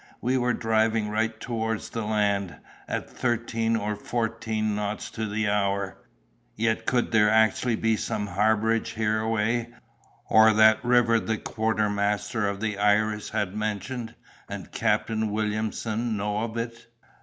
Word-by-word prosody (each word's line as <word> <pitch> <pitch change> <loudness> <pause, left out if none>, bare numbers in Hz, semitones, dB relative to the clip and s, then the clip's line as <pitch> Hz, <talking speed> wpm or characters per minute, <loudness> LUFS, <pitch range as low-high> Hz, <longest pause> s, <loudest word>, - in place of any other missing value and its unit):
We 125 +2 0
were 125 -2 +1
driving 110 -1 +1
right 110 +1 -1
towards 110 -2 -3
the 115 - -3
land, 100 -5 0 0.3
at - - -3
thirteen 115 -1 -1
or 105 -1 -1
fourteen 110 -1 -2
knots 105 0 -3
to 110 -1 -3
the 105 +1 -1
hour—yet 100 - -3
could 125 -2 +1
there 105 -2 +5
actually 110 +2 +3
be 115 0 +1
some 105 0 -3
harborage 110 +3 +1
hereaway, 110 +1 0 0.6
or 110 0 +6
that 110 0 +5
river 120 -2 +4
the 110 0 -2
quartermaster 105 -1 0
of 100 0 -5
the 105 -2 -2
Iris 105 +1 +2
had 100 -3 -2
mentioned, 110 +3 -3 0.3
and - - -7
Captain 110 -1 0
Williamson 110 +1 -2
know 105 +1 -1
of 115 0 -6
it? 115 0 -5
110 Hz, 130 wpm, -26 LUFS, 105-115 Hz, 0.6 s, or